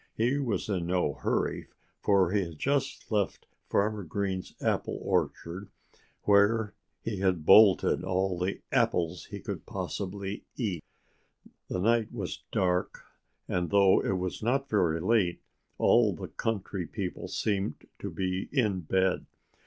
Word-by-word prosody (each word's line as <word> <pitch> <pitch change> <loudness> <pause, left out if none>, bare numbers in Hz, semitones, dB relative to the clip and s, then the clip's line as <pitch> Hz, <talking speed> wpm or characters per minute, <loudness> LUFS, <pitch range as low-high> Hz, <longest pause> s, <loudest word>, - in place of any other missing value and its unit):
He 125 +5 +1
was 120 -7 -1
in 90 -5 -1
no 90 -5 +1
hurry, - - -1 0.3
for 95 -3 +3
he 100 -1 +2
had 85 -3 -8
just 140 - -1
left 105 -4 0 0.2
Farmer 105 0 +1
Green's 95 +2 -3
apple - - -1
orchard, 90 +4 -2 0.5
where 105 +1 +4 0.3
he 115 -3 -3
had 95 -4 0
bolted 105 -2 +6
all 95 0 0
the 90 +2 -2
apples 85 +1 +1
he - - -7
could - - -6
possibly 100 +1 -4
eat. 95 -10 -2 0.9
The - - -2
night 115 +3 +2
was 100 -7 -5
dark 90 -4 0 0.4
and 90 -1 -1
though 100 -1 +5
it 95 - 0
was 90 0 -3
not 135 +5 0
very 85 -6 +2
late, 95 -1 +2 0.4
all - - +4
the - - -7
country 100 -5 -3
people - - -4
seemed 100 -6 -2
to - - -4
be 95 0 -2
in 105 -9 +1
bed. 95 +2 0
95 Hz, 135 wpm, -29 LUFS, 90-105 Hz, 0.9 s, bolted